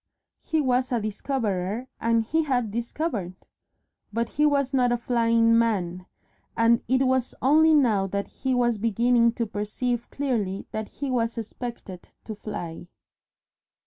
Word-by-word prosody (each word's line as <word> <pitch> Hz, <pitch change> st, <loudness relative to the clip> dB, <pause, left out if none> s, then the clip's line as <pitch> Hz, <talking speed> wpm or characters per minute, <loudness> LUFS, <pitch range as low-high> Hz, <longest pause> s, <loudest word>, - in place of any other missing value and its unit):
He 320 Hz, -1 st, 0 dB
was 255 Hz, -1 st, +1 dB
a 240 Hz, -, +1 dB
Discoverer 215 Hz, -1 st, -2 dB
and 230 Hz, 0 st, +2 dB
he 320 Hz, +9 st, +1 dB
had 250 Hz, -8 st, 0 dB
Discovered. 235 Hz, -, -3 dB, 0.8 s
But 230 Hz, +2 st, -1 dB
he 300 Hz, 0 st, +2 dB
was 280 Hz, -2 st, +1 dB
not 250 Hz, -2 st, +3 dB
a 240 Hz, -, +2 dB
Flying 230 Hz, -1 st, +3 dB
Man, 185 Hz, -6 st, 0 dB, 0.5 s
and 230 Hz, 0 st, +4 dB
it 260 Hz, +2 st, +2 dB
was 260 Hz, -1 st, 0 dB
only 310 Hz, +4 st, +5 dB
now 220 Hz, -9 st, +3 dB
that 200 Hz, +1 st, -2 dB
he 265 Hz, -1 st, -2 dB
was 240 Hz, -3 st, +1 dB
beginning 235 Hz, +2 st, +3 dB
to 235 Hz, -, -2 dB
perceive 225 Hz, +3 st, -3 dB
clearly 220 Hz, -9 st, -2 dB
that 215 Hz, -1 st, -4 dB
he 280 Hz, -2 st, -5 dB
was 235 Hz, -2 st, 0 dB
expected 225 Hz, -4 st, -7 dB
to 220 Hz, -, -6 dB
fly. 175 Hz, -5 st, -7 dB
235 Hz, 145 wpm, -25 LUFS, 215-255 Hz, 0.8 s, only